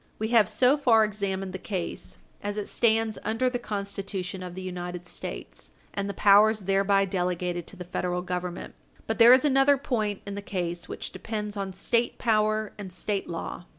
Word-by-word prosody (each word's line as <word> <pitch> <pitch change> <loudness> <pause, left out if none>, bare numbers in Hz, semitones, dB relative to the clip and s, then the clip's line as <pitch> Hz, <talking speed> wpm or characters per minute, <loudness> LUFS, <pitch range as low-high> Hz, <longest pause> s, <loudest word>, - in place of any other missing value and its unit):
We 220 0 -2
have 225 -3 +5
so 250 +6 +4
far 235 -6 +5
examined 195 -3 -2
the 190 - -5
case, 185 -4 -5 0.2
as 205 +1 -3
it 210 - -3
stands 225 -1 +1
under 225 +4 0
the 245 - -2
Constitution 195 -3 -4
of 180 -1 -7
the 185 - -6
United 180 -1 -5
States, - - -7 0.2
and 200 0 -2
the 200 - -4
powers 210 +2 +5
thereby 195 +1 +3
delegated 180 -2 -2
to - - -9
the 180 - -7
Federal 180 0 -2
Government. 180 -1 -4 0.3
But 225 - -2
there 230 +1 +9
is 255 +3 +7
another 275 0 +5
point 215 -7 -2
in 200 - -5
the 200 - -5
case 175 -3 -4
which - - -5
depends 210 -2 -4
on 195 -1 -3
State 230 +5 0
power 215 -1 +1
and 195 -3 -6
State 195 +2 -3
law. 170 +1 -5
200 Hz, 185 wpm, -27 LUFS, 180-220 Hz, 0.3 s, there